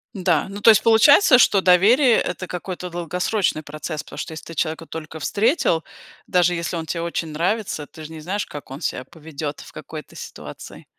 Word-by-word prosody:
Да, 175 Hz, -5 st, +1 dB
ну, 200 Hz, +1 st, -8 dB
то 215 Hz, -, +7 dB
есть 215 Hz, -1 st, +6 dB
получается, 255 Hz, -, +6 dB
что 200 Hz, -4 st, +5 dB
доверие- 220 Hz, +8 st, +5 dB
это 185 Hz, -, -4 dB
какой-то 180 Hz, 0 st, -6 dB
долгосрочный 175 Hz, 0 st, -1 dB
процесс, 155 Hz, +1 st, -6 dB
потому -, -, -12 dB
что 160 Hz, -, -5 dB
если 155 Hz, -, -9 dB
ты 165 Hz, -, -9 dB
человека 160 Hz, +1 st, -2 dB
только 160 Hz, 0 st, -8 dB
встретил, 210 Hz, -, +1 dB, 0.4 s
даже 180 Hz, -1 st, +3 dB
если 170 Hz, 0 st, -3 dB
он 160 Hz, -, -4 dB
те 165 Hz, +2 st, -3 dB
очень 170 Hz, -1 st, -3 dB
нравится, 170 Hz, 0 st, -2 dB
ты 155 Hz, -, -12 dB
же 155 Hz, -, -9 dB
не 160 Hz, -, -8 dB
знаешь, 190 Hz, +6 st, -3 dB
как 145 Hz, -2 st, -10 dB
он 135 Hz, -, -8 dB
себя 130 Hz, -5 st, -3 dB
поведет 150 Hz, -2 st, -7 dB
в -, -, -13 dB
какой-то 155 Hz, 0 st, -10 dB
ситуации. -, -, -10 dB
170 Hz, 190 wpm, -22 LUFS, 155-200 Hz, 0.4 s, то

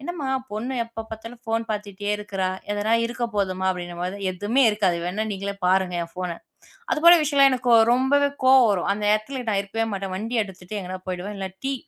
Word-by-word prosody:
என்னம்மா 300 Hz, -3 st, -4 dB, 0.2 s
பொண்ணு 225 Hz, +5 st, -3 dB
எப்போ 230 Hz, -1 st, -8 dB
பார்த்தாலும் 230 Hz, +2 st, -9 dB
போன் 225 Hz, 0 st, 0 dB
பார்த்துக்கொண்டே 205 Hz, -1 st, -3 dB
இருக்குற. 205 Hz, -2 st, -5 dB, 0.3 s
எதோ 205 Hz, +2 st, 0 dB
இருக்க 240 Hz, 0 st, -3 dB
போதுமா 190 Hz, -2 st, -1 dB
அப்படி 180 Hz, -1 st, -4 dB
என்றுபொழுது. 175 Hz, +3 st, -5 dB
எதுவுமே 205 Hz, +9 st, +1 dB
இருக்காது. 205 Hz, -5 st, +1 dB
வேண்டியா 200 Hz, +5 st, -2 dB
நீங்களே 200 Hz, +1 st, -4 dB
பாருங்க 185 Hz, -1 st, +2 dB
என் 170 Hz, -, -9 dB
போனை. 180 Hz, -2 st, -3 dB, 0.6 s
அதுபோல 340 Hz, +3 st, +7 dB
விஷயத்தில் 280 Hz, -2 st, +5 dB
எனக்கு 250 Hz, -2 st, +2 dB, 0.2 s
ரொம்பவே 275 Hz, +3 st, +3 dB
கோபம் 260 Hz, -2 st, +7 dB
வரும். 190 Hz, -2 st, -1 dB
அந்த 210 Hz, +1 st, -5 dB
இடத்தில் 240 Hz, +3 st, -3 dB
நான் 200 Hz, -2 st, +1 dB
இருக்கவே 225 Hz, +3 st, -2 dB
மாட்டேன். 195 Hz, -1 st, -4 dB
வண்டி 225 Hz, +4 st, -1 dB
எடுத்துவிட்டு 190 Hz, +1 st, -8 dB
எங்கோ 185 Hz, +1 st, -6 dB
போய்விடுவேன். 190 Hz, +2 st, -4 dB, 0.2 s
டீ 275 Hz, -, 0 dB
210 Hz, 175 wpm, -24 LUFS, 190-240 Hz, 0.6 s, அதுபோல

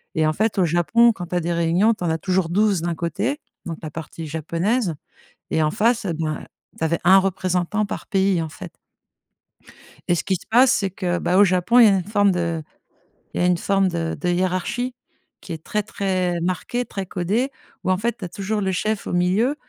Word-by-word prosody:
et 160 Hz, -, +2 dB
en 155 Hz, -, +1 dB
fait, 215 Hz, +5 st, 0 dB
au 180 Hz, -, +4 dB
Japon, 175 Hz, +8 st, +4 dB
quand 180 Hz, -5 st, -7 dB
tu 180 Hz, -, -4 dB
as -, -, +3 dB
des 170 Hz, +1 st, -2 dB
réunions, 170 Hz, +7 st, +3 dB
tu 195 Hz, -, -8 dB
en 170 Hz, -, 0 dB
as 160 Hz, -, 0 dB
toujours 185 Hz, -1 st, 0 dB
12 200 Hz, -1 st, +2 dB
d'un 170 Hz, -1 st, -2 dB
côté, 195 Hz, -, -2 dB, 0.3 s
donc 165 Hz, -2 st, -5 dB
la 155 Hz, -, -4 dB
partie 165 Hz, +1 st, -7 dB
japonaise 170 Hz, -, -1 dB, 0.6 s
et 160 Hz, -, +2 dB
en 155 Hz, -, +1 dB
face, 230 Hz, 0 st, +1 dB
eh 170 Hz, -, -1 dB
ben, 155 Hz, -1 st, -3 dB, 0.3 s
tu -, -, -4 dB
avais 165 Hz, +1 st, +1 dB
1 190 Hz, +2 st, +7 dB
représentant 185 Hz, +2 st, 0 dB
par -, -, -5 dB
pays, 190 Hz, -3 st, +2 dB
en 160 Hz, -, -5 dB
fait -, -, -9 dB, 1.4 s
et 175 Hz, -, +3 dB
ce -, -, -2 dB
qui 190 Hz, -, 0 dB
se -, -, -9 dB
passe, 250 Hz, +3 st, +6 dB
c'est 195 Hz, -, 0 dB
que, 175 Hz, -1 st, -2 dB
bah, 180 Hz, +2 st, +1 dB
au 205 Hz, -, +8 dB
Japon, 185 Hz, +5 st, +3 dB
il 235 Hz, -, +9 dB
y -, -, +7 dB
a 195 Hz, -, +4 dB
une 185 Hz, -, -2 dB
forme 205 Hz, 0 st, +2 dB
de 170 Hz, -3 st, -2 dB, 0.7 s
il -, -, -1 dB
y -, -, +2 dB
a -, -, +4 dB
une 180 Hz, -1 st, +3 dB
forme 195 Hz, +1 st, +1 dB
de 165 Hz, -2 st, -2 dB
de 180 Hz, -, -1 dB
hiérarchie 185 Hz, +8 st, -1 dB, 0.5 s
qui -, -, -7 dB
est 160 Hz, -1 st, -8 dB
très 210 Hz, 0 st, -1 dB
très 185 Hz, -4 st, -1 dB
marquée, 185 Hz, +7 st, -1 dB
très 195 Hz, -4 st, -5 dB
codée 205 Hz, +10 st, -1 dB, 0.3 s
où, 185 Hz, -, +1 dB
en 185 Hz, -, +2 dB
fait, 235 Hz, +4 st, -2 dB
tu 195 Hz, -, -5 dB
as -, -, -6 dB
toujours 205 Hz, +4 st, -3 dB
le 190 Hz, -1 st, 0 dB
chef 215 Hz, +3 st, -2 dB
au -, -, -3 dB
milieu 190 Hz, +10 st, +2 dB
185 Hz, 230 wpm, -22 LUFS, 170-210 Hz, 1.4 s, il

